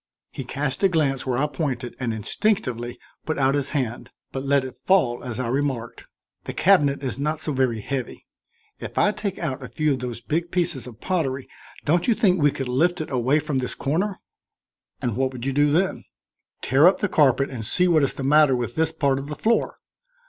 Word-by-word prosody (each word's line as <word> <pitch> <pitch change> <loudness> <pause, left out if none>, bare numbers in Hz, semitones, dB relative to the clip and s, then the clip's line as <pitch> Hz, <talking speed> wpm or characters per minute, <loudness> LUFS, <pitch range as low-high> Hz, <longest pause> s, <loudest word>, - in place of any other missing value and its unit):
He - - -6
cast 135 +1 -3
a 195 - +5
glance 140 -6 0
where 125 -2 0
I 140 - +2
pointed 135 -4 -3
and 125 -3 -1
instinctively 120 - -1 0.3
put 155 - -2
out 135 -1 +3
his 140 -1 -1
hand, 125 -5 -3 0.2
but 135 - -4
let 140 -1 +2
it 130 - -8
fall 125 -4 +1
as 125 -2 -5
I 125 - -1
remarked: 130 -2 -2 0.4
"The - - -6
cabinet 145 -7 +3
is 130 0 -3
not 150 +2 -1
so 155 -1 -3
very 130 -4 0
heavy. 130 +3 -5 0.5
If - - -8
I 210 - +4
take 200 -2 -4
out 145 -5 -3
a 125 - -7
few 155 -1 0
of 135 - 0
those 120 -2 -5
big 165 +7 -2
pieces 170 -8 -1
of 115 -3 -12
pottery, 140 -8 -1 0.4
don't 170 +3 +2
you 235 - +4
think 190 -7 +3
we 145 - +5
could 135 -2 -4
lift 165 +9 +1
it 155 - -5
away 130 +3 +2
from 145 -3 -1
this 125 - -4
corner?" 185 +8 -1 0.8
"And 120 -4 -1
what 130 +1 0
would 125 -1 -6
you 135 - 0
do 145 +1 +3
then?" 185 +5 0 0.6
"Tear 140 +6 +5
up 185 0 +4
the 205 - +2
carpet 140 -5 +3
and 120 -4 -5
see 180 +11 +2
what 165 -3 +4
is 140 - 0
the 135 - -5
matter 145 -1 +5
with 120 -1 -3
this 160 +2 +1
part 140 -4 +1
of 140 - -7
the 150 - -5
floor. 230 +7 +1
140 Hz, 215 wpm, -24 LUFS, 130-160 Hz, 0.8 s, a